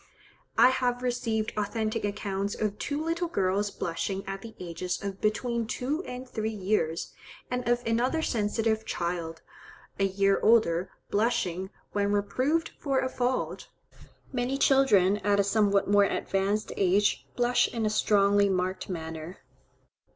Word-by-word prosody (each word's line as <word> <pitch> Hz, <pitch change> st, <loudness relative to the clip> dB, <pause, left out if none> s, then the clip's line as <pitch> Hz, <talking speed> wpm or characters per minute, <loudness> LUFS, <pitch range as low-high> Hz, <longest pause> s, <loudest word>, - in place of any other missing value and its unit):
I 250 Hz, -, +8 dB
have 250 Hz, -1 st, 0 dB
received 225 Hz, -3 st, -1 dB
authentic 215 Hz, +1 st, -1 dB
accounts 200 Hz, 0 st, -2 dB
of 210 Hz, -1 st, -2 dB
two 290 Hz, +1 st, -2 dB
little 335 Hz, +1 st, -1 dB
girls 200 Hz, -, 0 dB
blushing 190 Hz, +2 st, -3 dB
at 195 Hz, 0 st, -5 dB
the 225 Hz, 0 st, -10 dB
ages 180 Hz, +1 st, -4 dB
of 195 Hz, -1 st, -5 dB
between 230 Hz, +2 st, 0 dB
two 285 Hz, +9 st, -2 dB
and 250 Hz, +1 st, -7 dB
three 220 Hz, -3 st, -2 dB
years; 190 Hz, -6 st, -1 dB, 0.4 s
and 250 Hz, -1 st, -1 dB
of 240 Hz, 0 st, +1 dB
another 245 Hz, +8 st, +1 dB
sensitive 220 Hz, -1 st, 0 dB
child, 170 Hz, -4 st, -3 dB, 0.6 s
a 195 Hz, -, +3 dB
year 195 Hz, 0 st, +2 dB
older, 190 Hz, -6 st, +3 dB, 0.2 s
blushing, 190 Hz, -4 st, 0 dB, 0.2 s
when 205 Hz, 0 st, 0 dB
reproved 260 Hz, +11 st, 0 dB
for 275 Hz, -2 st, 0 dB
a 260 Hz, 0 st, -1 dB
fault. 250 Hz, 0 st, -2 dB, 0.7 s
Many 255 Hz, +2 st, -1 dB
children, 215 Hz, -9 st, +4 dB
at 205 Hz, -1 st, +1 dB
a -, -, +5 dB
somewhat 200 Hz, -1 st, +2 dB
more 205 Hz, 0 st, +5 dB
advanced 195 Hz, +2 st, -1 dB
age 200 Hz, +2 st, +2 dB
blush 245 Hz, 0 st, +3 dB
in 230 Hz, -2 st, -2 dB
a -, -, +2 dB
strongly 200 Hz, -1 st, +3 dB
marked 185 Hz, 0 st, -1 dB
manner. 160 Hz, 0 st, -6 dB
210 Hz, 140 wpm, -28 LUFS, 195-245 Hz, 0.7 s, I